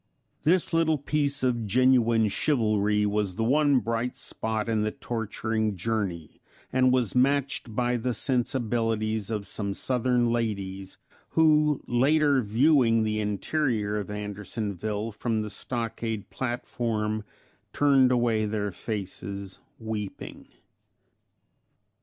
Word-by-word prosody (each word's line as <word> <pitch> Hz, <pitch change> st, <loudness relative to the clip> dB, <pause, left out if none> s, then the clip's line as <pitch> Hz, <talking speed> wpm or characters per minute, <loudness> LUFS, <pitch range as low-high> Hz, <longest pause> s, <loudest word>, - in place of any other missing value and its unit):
This 175 Hz, +2 st, +2 dB
little 160 Hz, -1 st, +3 dB
piece 145 Hz, -1 st, 0 dB
of 120 Hz, -4 st, 0 dB
genuine 120 Hz, -1 st, +4 dB
chivalry 105 Hz, -4 st, +1 dB
was 105 Hz, -2 st, -1 dB
the 115 Hz, -, -1 dB
one 145 Hz, +3 st, +3 dB
bright 115 Hz, +1 st, -2 dB
spot 110 Hz, 0 st, -2 dB
in 110 Hz, -2 st, +1 dB
the 105 Hz, -, +1 dB
torturing 110 Hz, -1 st, -2 dB
journey, 95 Hz, -5 st, -3 dB, 0.3 s
and 130 Hz, 0 st, +4 dB
was 125 Hz, -5 st, +1 dB
matched 135 Hz, -3 st, +1 dB
by 125 Hz, 0 st, +1 dB
the 125 Hz, +2 st, -1 dB
sensibilities 115 Hz, -5 st, 0 dB
of 105 Hz, -3 st, -3 dB
some 100 Hz, -2 st, -3 dB
Southern 125 Hz, -1 st, +1 dB
ladies, 100 Hz, -5 st, -3 dB, 0.4 s
who 150 Hz, -2 st, +4 dB
later 140 Hz, +3 st, +3 dB
viewing 115 Hz, 0 st, +3 dB
the 110 Hz, 0 st, -1 dB
interior 105 Hz, 0 st, -1 dB
of 105 Hz, -, -6 dB
Andersonville 105 Hz, +1 st, -4 dB
from 110 Hz, +1 st, -2 dB
the 105 Hz, -, -6 dB
stockade 115 Hz, -3 st, -4 dB
platform, 115 Hz, -4 st, -2 dB, 0.5 s
turned 135 Hz, -3 st, +4 dB
away 115 Hz, -3 st, +2 dB
their 105 Hz, -1 st, -2 dB
faces 100 Hz, -1 st, -6 dB, 0.2 s
weeping. 110 Hz, -3 st, -6 dB
115 Hz, 110 wpm, -27 LUFS, 105-130 Hz, 0.5 s, genuine